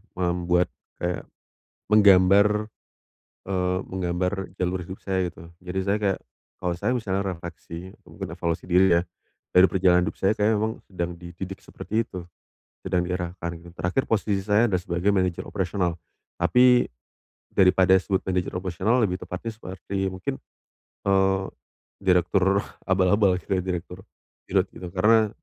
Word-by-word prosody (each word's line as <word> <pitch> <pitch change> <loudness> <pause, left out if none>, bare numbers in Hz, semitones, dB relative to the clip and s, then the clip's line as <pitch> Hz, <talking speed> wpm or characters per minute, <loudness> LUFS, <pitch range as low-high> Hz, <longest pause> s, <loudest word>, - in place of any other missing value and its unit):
membuat 90 0 +1 0.3
kayak, 90 0 -2 0.6
menggambar, 100 -1 +7 1.0
eee, 90 -1 0
menggambar 90 0 -2 0.2
jalur 90 0 -1
hidup 95 - -8
saya, 95 -2 0
gitu. 85 0 -12
Jadi 90 +1 -5
saya 100 +1 +1
kayak, 100 -2 +1 0.4
kalau 90 -1 0
saya 120 - 0
misalnya 100 -4 -1
refleksi, 85 +1 -9
mungkin - - -7
evaluasi 85 -1 -2
diri 90 0 +5
ya, - - 0 0.5
dari 90 +1 +8
perjalanan 90 -2 +3
hidup - - -4
saya, 95 +2 +3
kayaknya 105 +1 +3
memang 110 +1 0
sedang 90 -2 -3
dididik 95 +2 -8
seperti 110 +2 -3
itu, 90 -2 -7 0.6
sedang 90 - +1
diarahkan, 90 -1 -3
gitu. 85 +1 -13
Terakhir 90 +11 0
posisi 100 -3 +1
saya 105 +3 +4
adalah 90 -3 0
sebagai 90 +2 0
manajer 95 -2 0
operasional. 90 -3 -1 0.4
Tapi 125 0 +5 0.6
daripada 95 0 +5
disebut 95 0 -1
manajer 90 -1 -1
operasional, 95 +5 0
lebih 90 -4 0
tepatnya 90 +6 -5
seperti 95 -2 -5
mungkin, 95 0 -4 0.7
eee, 95 0 +3 0.6
direktur 95 +1 +3 0.2
abal-abal, 95 0 +3
kayak 95 0 -1
direktur 90 0 -5 0.5
dirut - - +3
gitu. 90 - -8
Karena 105 +4 +4
95 Hz, 135 wpm, -25 LUFS, 90-100 Hz, 1.0 s, dari